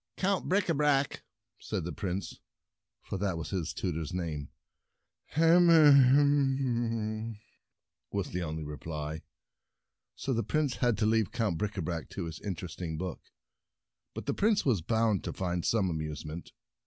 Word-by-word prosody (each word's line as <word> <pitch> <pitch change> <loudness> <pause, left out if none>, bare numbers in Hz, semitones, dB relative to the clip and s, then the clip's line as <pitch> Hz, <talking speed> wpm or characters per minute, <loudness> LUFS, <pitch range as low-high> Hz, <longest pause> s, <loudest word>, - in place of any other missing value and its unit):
" - - -49
Count 195 0 0
Bricabrac 150 -7 +2 0.2
!" 110 +2 -58
said 100 -5 -3
the 85 - -4
Prince, 95 +1 -4 0.6
for 95 - -4
that 95 -3 -1
was 85 - -5
his 90 -4 -2
tutor's 85 -2 -3
name. 80 -5 -3 0.4
" - - -52
Hum 170 +2 +6
um," 130 -7 +4 0.7
was 100 -2 -2
the 90 - -2
only 80 -1 -3
reply, 75 +1 -5 0.9
so 135 - -2
the 115 - +1
Prince 150 -1 0
had 120 -3 +2
to 110 - +1
leave 110 -1 +2
Count 110 -9 -1
Bricabrac 90 -5 -3
to 95 - -5
his 80 -1 -6
interesting 85 -3 -5
book. 90 0 -4 0.9
But - - -6
the - - 0
Prince 210 0 +2
was 115 - +2
bound 110 +2 +1
to - - -4
find 90 -2 -2
some 105 -5 +2
amusement. 75 +1 -5
105 Hz, 145 wpm, -30 LUFS, 85-135 Hz, 0.9 s, Hum